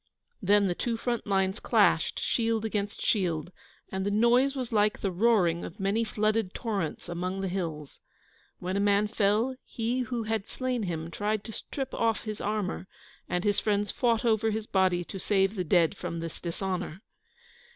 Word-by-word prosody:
Then 205 +1 +4
the 180 - +1
two 230 +5 -2
front 240 -1 -2
lines 195 0 +1
clashed, - - +3
shield 225 -1 0
against 205 -2 -2
shield, 175 -5 +1 0.4
and 190 0 -2
the 200 - 0
noise 240 +6 +4
was 255 -3 -3
like 210 -1 +2
the 195 - 0
roaring 180 -4 +3
of 170 - -8
many 200 +4 +1
flooded 215 -2 0
torrents 200 - -3
among 180 +2 -3
the 195 - -1
hills. 165 -6 -4 0.6
When 185 +1 -3
a - - +1
man 205 +1 +3
fell 215 +4 +2
he 235 +2 -2
who 245 -2 -2
had 220 -2 -2
slain 255 -2 -2
him 165 0 -4
tried 210 +2 -1
to 225 - -7
strip 270 +4 -5
off 225 -1 +1
his 215 -1 -5
armour, 205 -3 -2 0.4
and 180 0 0
his 205 -1 +2
friends 205 -2 0
fought 235 -1 +1
over 220 -1 +3
his 220 0 -2
body 185 -3 +2
to 190 +2 -7
save 195 0 +2
the 190 -4 -2
dead 170 -1 +3
from 165 - -4
this 165 -1 -6
dishonour. 180 +1 -3
205 Hz, 175 wpm, -29 LUFS, 185-225 Hz, 0.6 s, Then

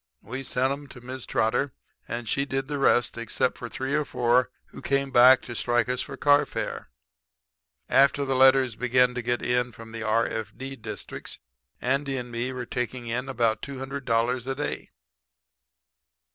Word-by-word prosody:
We 130 +6 -5
sent 130 0 +1
'em 145 0 -8
to 125 - -12
Mrs. 130 0 -7
Trotter 125 +5 +1 0.3
and 115 0 -4
she 140 - +1
did 135 -1 -2
the 145 -1 -3
rest; 120 -3 +3
except 115 +2 0
for 120 - -6
three 130 +5 -3
or 150 0 +2
four 125 -2 +2 0.2
who - - -11
came 140 0 0
back 125 +1 +7
to 120 - -7
strike 120 0 +1
us 125 0 0
for - - -7
carfare. 145 - +1 1.0
After 140 +1 +4
the 135 - 0
letters 130 -2 +5
began 125 +1 +3
to 125 - -3
get 120 +1 -1
in 125 0 +1
from 115 0 -12
the 115 0 -6
r.f.d. 115 +4 -2
districts 110 -2 -7 0.4
Andy 135 +1 0
and 125 -1 -5
me 120 +2 -2
were 125 -1 -5
taking 125 0 -3
in 125 +3 -3
about 115 -4 +1
$200 130 -3 -2
a 135 - -1
day. 145 +1 -4
125 Hz, 165 wpm, -26 LUFS, 120-135 Hz, 1.0 s, back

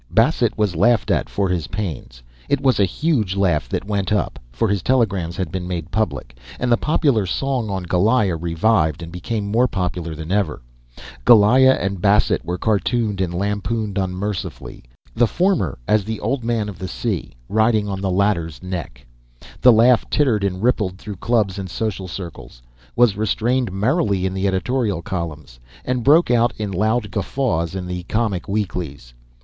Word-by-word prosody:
Bassett - - +2
was 105 -5 0
laughed 120 +8 +3
at - - 0
for 100 -1 0
his 90 -5 -1
pains. 80 -11 -6 0.3
It 140 0 +2
was 135 -4 +2
a 100 - +5
huge 110 - 0
laugh 90 -6 +1
that - - -3
went 100 -2 -2
up 105 -9 0
(for - - 0
his 100 -2 0
telegrams 100 -9 0
had 95 - -3
been 90 -2 -4
made 85 -2 -4
public), 70 - -2 0.2
and 125 -1 0
the - - +7
popular 135 - +1
song 130 +2 -1
on 95 -2 -3
Goliah 95 +2 +2
revived 85 -1 +1
and 85 - -8
became 100 +4 -3
more 115 +5 +2
popular 90 -5 -3
than 80 +2 -7
ever. 95 -10 0 0.6
Goliah 125 +4 +6
and 100 -2 -3
Bassett 105 +1 +3
were 90 +1 -3
cartooned 110 0 0
and 90 -2 -1
lampooned 100 +2 -2
unmercifully, 95 +1 -4 0.3
the 120 +1 +3
former, 175 - 0
as 105 -1 +3
the 110 +1 -4
Old 125 +3 -2
Man 115 -2 -1
of 95 -4 -8
the 95 - -4
Sea, - - -3
riding 110 0 +2
on 95 -1 -4
the 95 - -1
latter's 90 -4 0
neck. 85 -10 -6 0.6
The 125 - +8
laugh 120 +2 +4
tittered 125 -9 +2
and 95 0 -2
rippled 105 -7 +1
through 105 -1 -8
clubs 105 -3 0
and 95 -1 -5
social 100 -2 -3
circles, 85 -9 -9 0.3
was 120 -4 +4
restrainedly 110 +3 0
merry 105 - +1
in 95 - -1
the 95 +1 -1
editorial 95 0 -1
columns, 75 - -5 0.3
and 125 -2 -1
broke 150 +3 +5
out 120 -1 +3
in 105 -2 -3
loud 110 +4 0
guffaws 100 -6 -1
in 95 -1 -4
the 90 0 -4
comic 110 -5 -1
weeklies. 85 - -4
100 Hz, 170 wpm, -20 LUFS, 90-115 Hz, 0.6 s, The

